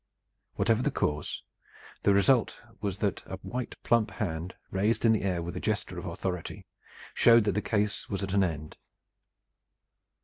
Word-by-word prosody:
Whatever 115 0 +2
the - - +2
cause, 75 0 -2 0.6
the 100 - +4
result 105 +5 +3 0.2
was 100 -3 -2
that 100 -1 -1
a 95 - -5
white 125 -1 -4
plump 115 -3 +3
hand, 90 -5 -4 0.2
raised 105 +5 +1
in 115 - +6
the 110 - +1
air 90 -3 -1
with 85 0 -5
a - - -2
gesture - - -2
of - - -6
authority, 90 0 -4 0.5
showed 115 -1 +6
that 105 - +2
the 105 +3 0
case 105 -1 -1
was 100 0 -2
at 95 0 -3
an 100 -1 +4
end. 75 -4 -3
100 Hz, 165 wpm, -29 LUFS, 90-110 Hz, 0.6 s, in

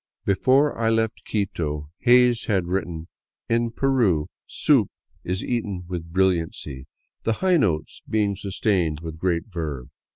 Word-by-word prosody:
Before 130 +9 +3
I 115 0 +1
left 110 -1 0
Quito, 75 -8 -2
Hays 125 -1 +4
had 95 -5 +1
written, 85 -3 -3 0.2
" - - -57
In 115 0 +2
Peru 115 - +1 0.2
soup - - +3 0.3
is 90 +3 -2
eaten 105 -7 -2
with 85 -2 -5
brilliancy, 85 -7 0 0.3
the 115 - +1
high 185 +8 +2
notes 85 - 0
being 105 -2 +1
sustained 95 -5 0
with 80 -1 -7
great 85 -2 0
verve." 80 - -5
95 Hz, 135 wpm, -24 LUFS, 80-115 Hz, 0.3 s, Hays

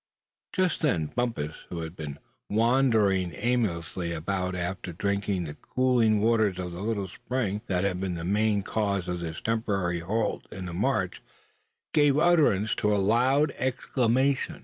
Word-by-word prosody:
Just 185 -3 0
then 85 - +1
Bumpus, 115 -12 -1 0.2
who 85 -2 -4
had 80 +1 -6
been 75 -4 -6 0.3
wandering 110 -6 +3
aimlessly 95 -7 -1
about 90 +2 -2
after 90 0 -4
drinking 100 -1 -1
at 75 0 -9
the - - -28
cooling 120 -5 +3
waters 110 -4 +2
of 90 -1 -4
the 85 +2 -7
little 105 -2 -1
spring 105 +1 -3
that 90 -1 0
had 95 -2 0
been 95 -2 -2
the 85 0 -5
main 105 +1 +2
cause 100 -4 -1
of 90 0 -2
this 80 -1 -5
temporary 100 -6 0
halt 105 +6 -2
in 95 0 -6
the 90 - -6
march, 105 -1 0 0.7
gave 145 -2 +4
utterance 150 - +4
to 105 0 +1
a - - +2
loud 125 +9 +3
exclamation. 130 +1 +1
100 Hz, 155 wpm, -27 LUFS, 90-120 Hz, 0.7 s, gave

